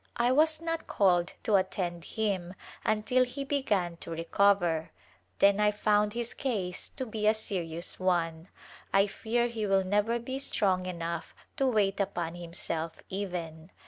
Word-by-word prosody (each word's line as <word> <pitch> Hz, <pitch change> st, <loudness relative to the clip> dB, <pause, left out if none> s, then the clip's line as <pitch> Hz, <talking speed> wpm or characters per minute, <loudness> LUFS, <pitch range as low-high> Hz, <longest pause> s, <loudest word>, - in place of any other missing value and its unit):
I 240 Hz, +1 st, +3 dB
was 310 Hz, +3 st, +4 dB
not 330 Hz, 0 st, -3 dB
called 180 Hz, -3 st, +2 dB
to 210 Hz, -3 st, +4 dB
attend 180 Hz, -2 st, -2 dB
him 195 Hz, -5 st, -2 dB, 0.3 s
until 220 Hz, +4 st, +2 dB
he 255 Hz, +3 st, -4 dB
began 205 Hz, -12 st, 0 dB
to -, -, -9 dB
re 165 Hz, 0 st, -3 dB
cover, 175 Hz, -3 st, +2 dB, 0.5 s
then 200 Hz, +1 st, +5 dB
I 210 Hz, 0 st, +5 dB
found 210 Hz, 0 st, +2 dB
his 235 Hz, 0 st, -3 dB
case 195 Hz, -9 st, -2 dB
to 260 Hz, -, -3 dB
be 215 Hz, -2 st, -2 dB
a 215 Hz, -, +5 dB
serious 175 Hz, -5 st, -2 dB
one. 170 Hz, -2 st, 0 dB, 0.4 s
I 195 Hz, 0 st, +5 dB
fear 235 Hz, +4 st, 0 dB
he 225 Hz, -3 st, -3 dB
will 195 Hz, -1 st, +3 dB
never 210 Hz, +5 st, +1 dB
be 260 Hz, +3 st, -4 dB
strong 190 Hz, -8 st, +1 dB
enough 170 Hz, -2 st, -4 dB, 0.2 s
to 270 Hz, -3 st, +2 dB
wait 210 Hz, -5 st, +2 dB
upon 175 Hz, -4 st, -1 dB
him 175 Hz, -1 st, -8 dB
self, 165 Hz, -1 st, -3 dB
even. 175 Hz, -4 st, -5 dB
200 Hz, 160 wpm, -30 LUFS, 175-225 Hz, 0.5 s, then